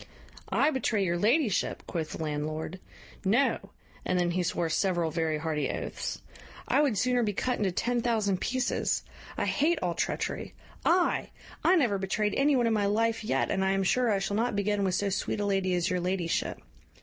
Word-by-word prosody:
"I 300 - +3
betray 220 -7 0
your 175 -1 0
ladyship!" 230 - +1
quoth 160 -3 -4
the - - -4
landlord; 155 +3 -3 0.4
"no 230 +9 +2 0.3
(and 180 - 0
then 175 -1 +1
he 180 +1 0
swore 175 -1 0
several 170 0 +1
very 160 -2 0
hearty 150 -2 -1
oaths); - - -4 0.4
I - - +3
would 270 -8 +1
sooner 250 +4 +2
be 210 -3 0
cut 250 +5 -1
into 200 -3 +1
ten 240 +6 0
thousand 215 -5 0
pieces. 255 0 0 0.3
I - - 0
hate 320 +4 +2
all 175 -1 0
treachery. - - -3 0.3
I! 350 +1 +2 0.3
I - - +5
never 240 - +2
betrayed 205 +2 0
any 280 +1 +3
one 245 -2 +2
in 230 - +2
my 205 -2 +2
life 225 +2 +1
yet, 215 - 0
and 190 - +1
I 190 0 +2
am 195 0 +1
sure 245 +5 +2
I 205 - +3
shall 195 +1 -2
not 230 +1 0
begin 205 0 0
with 185 -2 +1
so 200 +1 0
sweet 195 - -2
a 205 - 0
lady 195 -2 +1
as 175 0 0
your 180 - +1
ladyship. 180 -1 -1
200 Hz, 195 wpm, -29 LUFS, 180-235 Hz, 0.4 s, I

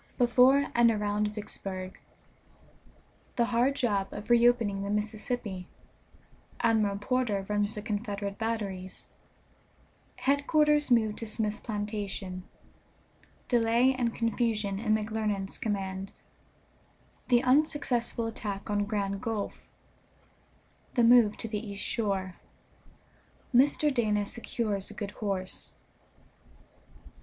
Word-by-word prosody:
BEFORE 255 +3 +4
AND 235 0 +5
AROUND 210 -1 0
VICKSBURG. 195 -3 -6 1.4
The 235 - +3
hard 245 +3 +2
job 205 -8 0
of 210 +3 -6
reopening 235 -4 +4
the 200 - -3
Mississippi 210 -2 -3 0.9
Admiral 215 -3 +2
Porter 210 -3 0
runs 205 0 0
the 210 - -5
Confederate 205 -2 -3
batteries 200 -5 -4 1.1
Headquarters 295 +1 +2
moved 220 -3 +3
to 230 - -5
Smith's 215 -1 -1
plantation 205 -4 -4 1.1
Delay 240 +2 +3
and 240 -3 -1
confusion 225 -4 0
in 215 -1 +2
McClernand's 215 -2 -2
command 195 -2 -3 1.2
The 245 0 +4
unsuccessful 255 -4 +1
attack 210 -3 -5
on 205 0 +1
Grand 200 -2 -2
Gulf 225 -4 -2 1.4
The 240 - +4
move 230 -3 +6
to - - -3
the 215 -1 -3
east 200 -2 -4
shore 195 -5 -1 1.2
Mr. 285 +3 +4
Dana 210 -4 +1
secures 215 -3 -2
a - - -10
good 205 -1 -5
horse. 190 -3 -3
215 Hz, 100 wpm, -29 LUFS, 200-240 Hz, 1.4 s, move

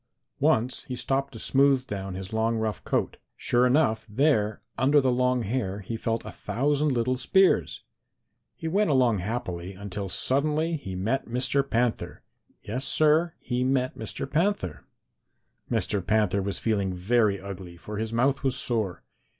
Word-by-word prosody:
Once 120 +3 +1
he 130 - -5
stopped 135 +2 -1
to 115 - -10
smooth 135 +2 +3
down 95 -3 -5
his 95 +2 -7
long, 115 +1 +1
rough 110 -3 -2
coat. - - -1 0.2
Sure 125 +1 +2
enough, 125 -5 +2
there, 110 -3 +1
under 140 +3 +4
the 130 -2 +2
long 125 0 +1
hair, 100 -3 -2
he 105 +4 -5
felt 115 0 -2
a - - -6
thousand 145 +3 0
little 125 +1 0
spears. 190 +8 +2 0.7
He 160 - -5
went 200 +3 +2
along 125 -7 +3
happily 95 -3 -4
until 100 0 -5
suddenly 150 - +1
he 95 -11 -6
met 110 +9 -1
Mr. 125 +4 +1
Panther. 120 0 -1 0.4
Yes, 125 +6 -3
Sir, 155 +3 +3
he 125 0 -2
met 130 0 0
Mr. 110 +4 -5
Panther. 140 - -1 0.8
"Mr. 100 -3 0
Panther 105 -1 +2
was 100 +1 -2
feeling 100 -4 0
very 100 +1 +2
ugly, 95 -3 -8
for 105 +4 -7
his 110 0 -3
mouth 130 +4 +1
was 135 -3 0
sore. 110 -7 -2
120 Hz, 155 wpm, -26 LUFS, 100-135 Hz, 0.8 s, under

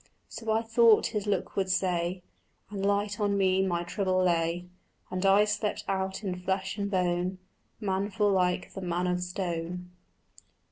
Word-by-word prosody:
So 225 - -7
I 220 +1 +2
thought 225 -1 +5
his 210 -1 -2
look 205 - -1
would 190 -1 0
say; 180 -1 0 0.5
And 200 -2 -4
light 205 +1 0
on 205 -1 +1
me 190 -1 +3
my 175 -2 0
trouble 185 +1 0
lay, 170 0 +1 0.4
And 185 0 -2
I 200 +2 +6
slept 210 0 -1
out 190 +1 -2
in 180 -2 -3
flesh 190 +1 -2
and 200 0 -1
bone 180 -1 0 0.4
Manful 205 +1 0
like 180 -2 +1
the 195 - -6
man 175 0 -1
of 180 0 0
stone. 180 -1 -4
190 Hz, 155 wpm, -29 LUFS, 180-205 Hz, 0.5 s, I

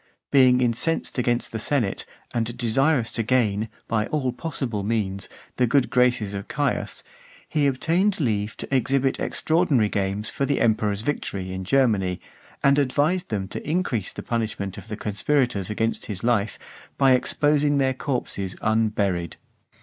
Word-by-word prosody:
Being 130 -2 +5
incensed 125 +5 0
against 120 0 0
the 110 - -3
senate, 120 -4 -1 0.3
and 120 0 -2
desirous 125 +1 +2
to - - -1
gain, 110 -3 +1 0.2
by 110 -1 0
all 135 -4 -1
possible 125 -6 -3
means, 100 -3 -2 0.3
the 125 - +3
good 135 +2 +2
graces 125 -5 +2
of 100 0 -5
Caius, 145 0 -2 0.4
he 150 -3 +1
obtained 170 +9 +1
leave 110 -6 -1
to 135 - -3
exhibit 135 +1 +1
extraordinary 155 - +1
games 100 +1 -2
for - - -2
the 140 - +1
emperor's 105 -3 +1
victory 100 -8 -3
in 95 0 -4
Germany, 100 -7 +2 0.4
and 140 +1 +5
advised 150 +7 +1
them 100 -3 -2
to - - -6
increase 155 - -1
the - - -8
punishment 110 -4 -2
of 100 0 -10
the 105 -1 -5
conspirators 110 -1 0
against 115 +1 -1
his 100 -2 -5
life, 110 -3 +1 0.4
by 135 -1 +5
exposing 145 +3 +2
their 135 -1 +2
corpses 120 -8 -2
unburied. 105 -6 0
120 Hz, 150 wpm, -24 LUFS, 105-135 Hz, 0.4 s, Being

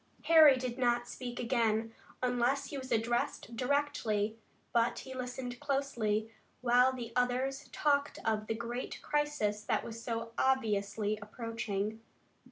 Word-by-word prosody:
Harry 315 -5 +8
did 255 0 -4
not 240 -1 +2
speak 245 -1 -6
again, 225 -2 +1 0.3
unless 250 +3 +1
he 285 - -4
was 260 0 -8
addressed 235 +1 0
directly, 250 -6 0 0.4
but 235 0 +2
he 260 - -7
listened 250 -1 -5
closely, 240 -7 0 0.3
while 250 +1 +5
the 240 -3 -6
others 255 +3 0
talked 285 -1 +1
of 215 -1 0
the 225 - -1
great 235 +2 -4
crisis 295 -9 0
that 220 -2 0
was 230 0 -7
so 230 -1 -3
obviously 215 -4 +1
approaching. 215 -1 -3
240 Hz, 130 wpm, -33 LUFS, 225-260 Hz, 0.4 s, Harry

